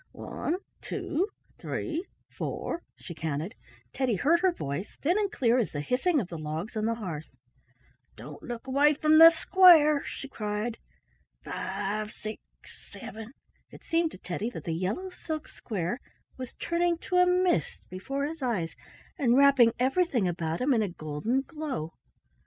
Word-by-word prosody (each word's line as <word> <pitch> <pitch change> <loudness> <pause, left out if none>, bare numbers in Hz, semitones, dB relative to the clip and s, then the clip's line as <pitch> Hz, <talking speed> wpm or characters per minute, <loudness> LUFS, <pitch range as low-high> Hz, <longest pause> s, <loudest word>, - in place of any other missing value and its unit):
"One—two—three—four," 350 -1 -4
she 175 - -9
counted; 160 - -3 0.4
Teddy 255 -5 +1
heard 315 - +3
her 375 +1 +3
voice, 170 - -5
thin 350 +8 +2
and 410 -2 0
clear 250 - +2
as 230 - 0
the 145 - -2
hissing 285 - +1
of 205 - -3
the 170 -3 -7
logs 155 +9 -4
on 215 0 0
the 230 +1 +1
hearth. 170 -9 -5 0.9
"Don't 145 +6 -10
look 240 0 -6
away 285 +3 +4
from 310 +2 +5
the 330 0 +12
square," 325 -3 +6
she 275 - -6
cried. 215 -1 -3 0.6
"Five—six—seven" 215 +3 -6 0.4
—it - - -14
seemed 330 0 +1
to - - -9
Teddy 190 +5 -3
that - - -8
the 170 -5 -2
yellow 200 - -2
silk 310 -3 -5
square 195 +1 -4 0.4
was 255 -1 -8
turning 340 0 0
to 360 +2 -2
a 360 0 +6
mist 360 - +1
before 275 +10 -3
his 320 +1 -6
eyes 205 -11 -1 0.4
and 250 -3 +4
wrapping 275 -4 +6
everything 260 - +2
about 165 -2 -2
him 270 +2 +3
in 230 - +3
a 205 - 0
golden 160 - -2
glow. 275 - -5
245 Hz, 145 wpm, -28 LUFS, 190-315 Hz, 0.9 s, the